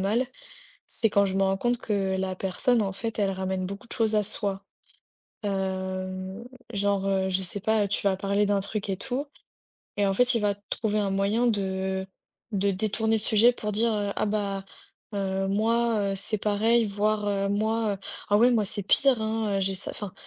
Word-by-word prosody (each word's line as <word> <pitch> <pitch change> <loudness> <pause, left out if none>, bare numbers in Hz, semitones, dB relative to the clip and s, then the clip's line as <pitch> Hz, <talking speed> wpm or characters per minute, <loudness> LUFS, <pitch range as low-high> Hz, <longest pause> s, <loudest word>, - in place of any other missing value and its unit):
mal, 220 +7 +1 0.6
c'est 225 - +2
quand 200 0 +3
je 190 - -2
me 195 - +1
rends 195 0 +1
compte 240 +4 +1
que 195 -3 -1
la 190 0 -2
personne, 205 +6 +1
en 195 -1 -2
fait, 225 +3 -4
elle 195 -1 +2
ramène 190 0 -2
beaucoup 200 +4 -7
de - - 0
choses 220 -1 +1
à 210 - +3
soi. 200 -1 -1 0.8
Heu, 190 +1 -3 0.3
genre, 200 -1 +1
heu, 190 -1 +1
je 190 +1 0
sais 190 +2 -2
pas, 215 0 +1
tu 200 - 0
vas 190 - +2
parler 200 +1 +1
d'un 200 0 +2
truc 205 +1 -3
et 190 - -1
tout 270 +5 -3 0.7
et 205 - +3
en 195 - +2
fait, 245 +5 +4
il 230 - +1
va 205 -1 +2
trouver 210 +1 -2
un 200 -2 0
moyen 200 +5 +1
de 190 -3 -1 0.5
de 200 0 +1
détourner 220 +3 +1
le - - 0
sujet 225 +2 +4
pour 210 -3 -4
dire: 210 -2 +1
«Ah, - - +1
bah 200 -2 -2 0.5
heu, 195 -1 -1
moi, 220 0 +1
heu, - - -2
c'est 200 +2 0
pareil, 220 +3 +2
voire 205 -1 0
moi, 215 0 0 0.3
ah 205 - +4
oui, 240 +4 +5
moi, 220 -3 +2
c'est 205 0 +1
pire, 255 +3 +4
hein, 220 -2 -1
j'ai 195 0 +1
ça» 190 - -3
enfin, 205 -3 -6
205 Hz, 190 wpm, -26 LUFS, 195-220 Hz, 0.8 s, oui